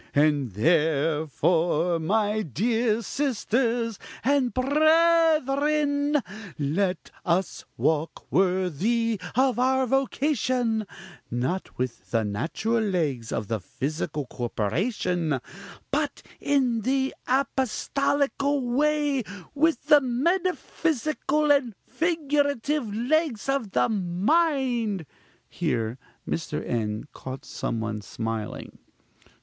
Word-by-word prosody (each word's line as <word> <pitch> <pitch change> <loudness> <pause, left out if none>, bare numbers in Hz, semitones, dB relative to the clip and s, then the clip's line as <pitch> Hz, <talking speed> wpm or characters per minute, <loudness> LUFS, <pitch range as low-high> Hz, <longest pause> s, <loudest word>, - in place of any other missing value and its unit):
"And, 145 -6 +2
therefore, 160 - +2
my 210 +5 +1
dear 220 - 0
sisters 235 -4 0 0.2
and 265 -1 +2
brethren, 300 0 +3 0.4
let 180 +6 -1
us 180 +2 0
walk 160 0 0
worthy 190 +5 +1
of 260 -1 +3
our 260 +1 +3
vocation; 255 -4 0 0.4
not 130 +11 -3
with 125 -1 -4
the 115 -2 +1
natural 165 - -1
legs 150 - -1
of 105 - -2
the 110 0 -1
physical 150 - -3
corporation, 155 - -1 0.5
but 290 0 -1 0.2
in 255 -5 +1
the 265 +3 0
apostolical 275 +2 +1
way, 290 +1 +2 0.3
with 300 -2 +1
the 300 -1 +7
metaphysical 305 0 0
and 260 -7 +2
figurative 290 -6 0
legs 250 +3 0
of 270 -6 0
the 125 -9 +2
mind 225 - +1 0.4
(here 115 +2 -2 0.3
Mr. 160 - -3
N. 110 -2 -1
caught 130 +1 -8
some 115 - -3
one 105 -1 -3
smiling). 110 +1 -5
230 Hz, 90 wpm, -26 LUFS, -, 0.5 s, the